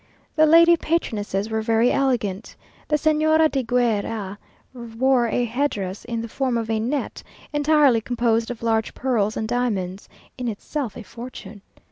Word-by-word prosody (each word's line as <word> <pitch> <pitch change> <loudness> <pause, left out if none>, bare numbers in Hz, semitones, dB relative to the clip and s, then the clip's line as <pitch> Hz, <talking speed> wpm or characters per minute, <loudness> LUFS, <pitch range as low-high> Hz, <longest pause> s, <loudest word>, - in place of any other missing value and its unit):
The 310 -1 +5
lady 335 +2 +7
patronesses 220 - -2
were 220 0 0
very 225 +2 +2
elegant. 230 -7 -1 0.3
The 300 - +2
Señora 310 +1 +3
de 270 -1 0
Guer 235 -3 +1
a, 205 -3 -5 0.3
wore 240 +1 0
a 240 +2 0
head 260 +6 0
dress 195 -4 -6
in 230 -1 -3
the - - -5
form 255 +1 -1
of 225 -1 -3
a 220 - 0
net, 260 +6 -3 0.3
entirely 295 -5 +4
composed 230 -1 0
of 240 -2 -7
large 225 -1 0
pearls 220 -5 0
and 220 - -2
diamonds; 205 -6 -2 0.3
in 250 - -3
itself 230 +2 -4
a 235 - -8
fortune. 225 -3 -10
235 Hz, 160 wpm, -22 LUFS, 220-270 Hz, 0.3 s, lady